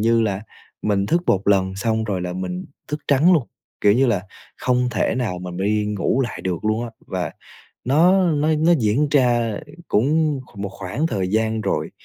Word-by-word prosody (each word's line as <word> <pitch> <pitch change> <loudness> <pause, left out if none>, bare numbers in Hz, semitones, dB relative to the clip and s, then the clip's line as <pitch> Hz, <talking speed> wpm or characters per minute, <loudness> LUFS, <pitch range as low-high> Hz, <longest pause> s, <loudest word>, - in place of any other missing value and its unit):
như 115 +1 +3
là 100 -3 -1 0.4
mình 100 -2 +1
thức 170 +6 +1
1 100 +1 +1
lần 95 -1 +2
xong 110 +2 0
rồi 100 -4 -2
là 90 0 -3
mình 90 0 -4 0.2
thức 150 0 -3
trắng 150 +6 +5
luôn, 150 -9 +2 0.3
kiểu 100 - +5
như 130 +5 +3
là, 105 -6 +1 0.3
không 125 0 +1
thể 105 - 0
nào 115 -8 -2
mà 90 0 -6
mình 90 - -7
đi 105 0 +1
ngủ 105 +5 0
lại 125 - -3
được 95 +1 -3
luôn 110 +2 0
á, 115 - -6 0.2
và 90 -4 -3 0.5
nó 180 +8 +4
nó 150 +1 +1
nó 165 +3 +4
diễn 120 +7 +2
ra 120 -6 +2 0.3
cũng 145 +4 +2
kh 105 - -14
một 100 -1 -3
khoảng 115 - -2
thời 95 - -1
gian 110 +1 0
rồi. - - -1
110 Hz, 200 wpm, -21 LUFS, 100-135 Hz, 0.5 s, trắng